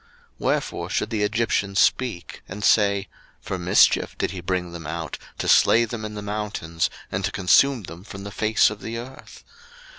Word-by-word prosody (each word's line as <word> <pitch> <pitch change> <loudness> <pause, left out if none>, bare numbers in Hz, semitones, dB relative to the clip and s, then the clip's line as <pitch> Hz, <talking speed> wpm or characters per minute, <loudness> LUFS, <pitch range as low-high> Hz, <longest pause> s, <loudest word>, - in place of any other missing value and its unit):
02:032:012 - - -31 0.3
Wherefore - - -1
should - - -1
the 110 -2 -1
Egyptians 105 -2 0
speak, 110 -9 0
and 100 +2 -7
say, 100 -2 +3 0.3
For 95 - -5
mischief 90 +1 +3
did - - -1
he 90 -2 -6
bring 90 0 -2
them 85 -2 -8
out, 80 -1 -5 0.2
to - - -3
slay 115 +1 +5
them 110 -1 -6
in 105 0 -6
the 105 - -6
mountains, 100 -6 -2 0.2
and 95 +1 -2
to 95 - 0
consume 115 +6 +3
them 85 +1 -10
from 100 -1 -9
the 100 - -7
face 110 +1 +3
of 105 -1 -8
the 115 +1 -5
earth? 125 +3 -10
100 Hz, 185 wpm, -23 LUFS, 90-110 Hz, 0.3 s, slay